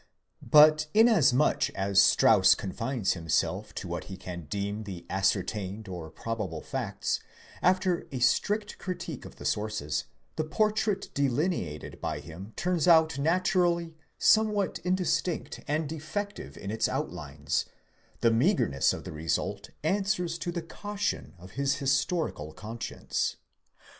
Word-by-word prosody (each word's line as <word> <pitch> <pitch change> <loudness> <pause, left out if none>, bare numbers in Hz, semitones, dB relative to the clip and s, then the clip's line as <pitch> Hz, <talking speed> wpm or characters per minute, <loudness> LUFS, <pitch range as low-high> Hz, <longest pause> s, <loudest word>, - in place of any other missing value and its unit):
But 155 0 +6
inasmuch 195 - +4
as: 100 0 +4
Strauss 95 - +6
confines 115 +3 -1
himself 80 -3 -1
to - - -5
what - - -4
he 95 - -8
can 90 -3 -7
deem 100 +5 -3
the 90 -4 -7
ascertained 95 +2 -1
or 85 -4 -6
probable 100 -3 -4
facts, - - -2 0.4
after 185 -1 +2
a 135 - -3
strict 205 - +1
critique 175 -6 -5
of - - -11
the - - -10
sources, 105 -9 -1 0.3
the 155 - +1
portrait 210 +4 0
delineated 135 - -1
by - - -2
him 85 - -10
turns: 180 -2 0
out 160 -4 +5
naturally 170 +1 +1 0.2
somewhat 215 -2 +3
indistinct 180 -2 -1
and 150 +1 0
defective 160 +7 -5
in 100 - -5
its 110 0 0
outlines; - - -2 0.6
the 115 - +4
meagreness 115 - +2
of - - -6
the - - -7
result 80 +1 -2
answers 180 -1 0
to 175 +2 -3
the 170 -1 -4
caution 205 - -4
of 90 +2 -13
his 140 +3 0
historical 135 - -1
conscience. 115 +5 -3
140 Hz, 130 wpm, -29 LUFS, -, 0.6 s, But